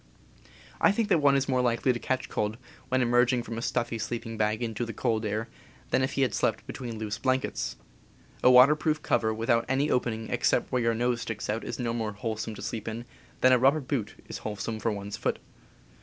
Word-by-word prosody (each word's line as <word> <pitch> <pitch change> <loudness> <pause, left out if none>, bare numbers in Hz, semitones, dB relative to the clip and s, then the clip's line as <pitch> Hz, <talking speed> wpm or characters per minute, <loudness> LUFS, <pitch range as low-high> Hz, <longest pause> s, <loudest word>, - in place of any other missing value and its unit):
I - - +5
think 215 +1 0
that 175 -5 +4
one 140 -1 +5
is 135 -1 +1
more 130 -2 +2
likely 120 +1 +2
to 120 - -4
catch 130 +1 -2
cold 105 +1 -2 0.3
when 130 0 +2
emerging 120 0 +3
from 115 -1 -5
a - - -5
stuffy 120 -1 -1
sleeping 115 +1 -4
bag 110 +2 0
into 115 0 -2
the 115 -1 -5
cold 110 -1 0
air 110 +2 -2 0.4
than - - +3
if 130 - 0
he 135 - +2
had 125 -5 0
slept - - 0
between 120 -3 -6
loose 105 -1 -4
blankets. 130 0 -1 0.7
A - - +6
water 125 +4 +8
proof 155 0 -1
cover 110 -1 +2
without 115 +1 +1
any 135 +3 +1
opening 115 -3 -1
except - - +1
where 125 - +1
your 115 -1 +2
nose 120 +1 0
sticks 110 -2 -3
out 110 +2 -3
is 120 - -5
no 120 -2 -1
more 110 -2 -2
wholesome 110 +1 -4
to - - -8
sleep 110 -2 -4
in 115 +2 -4 0.4
than 130 - +6
a 125 - +5
rubber 135 +5 +4
boot 130 -6 -3
is - - -6
wholesome 110 +1 -4
for 115 - 0
one's 100 0 -5
foot. - - -1
120 Hz, 215 wpm, -28 LUFS, 110-130 Hz, 0.7 s, water